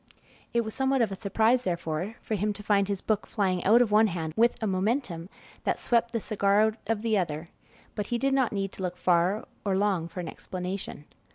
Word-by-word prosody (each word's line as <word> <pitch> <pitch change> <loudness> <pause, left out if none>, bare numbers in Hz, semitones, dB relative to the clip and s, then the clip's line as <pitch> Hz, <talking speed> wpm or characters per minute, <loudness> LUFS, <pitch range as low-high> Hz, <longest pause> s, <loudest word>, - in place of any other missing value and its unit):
It 235 - +2
was 220 -1 -5
somewhat 265 -1 +2
of 215 - -1
a - - -3
surprise, 225 +5 +2
therefore, 170 +1 -3
for - - -3
him 210 +1 0
to 210 - -10
find 200 -2 +2
his 200 -2 -2
book 215 -2 0
flying 185 -4 0
out 230 +5 +6
of 220 - -4
one 215 +1 +6
hand 165 -4 -3
with 235 +1 +3
a 220 - -2
momentum 190 -3 -1 0.3
that - - 0
swept 235 -1 +1
the 230 - -1
cigar 200 -1 +2
out 220 0 +2
of 225 -1 -1
the 220 -3 +2
other; 160 -1 -3 0.4
but 210 -2 -3
he 240 - 0
did 275 +2 +1
not 260 -4 +2
need 195 -2 -2
to - - -9
look 180 -1 -3
far 180 +4 +2 0.2
or 195 -2 +1
long 195 -5 +1
for 170 +2 -8
an 175 - -4
explanation. 180 -3 -6
205 Hz, 220 wpm, -28 LUFS, 185-225 Hz, 0.4 s, out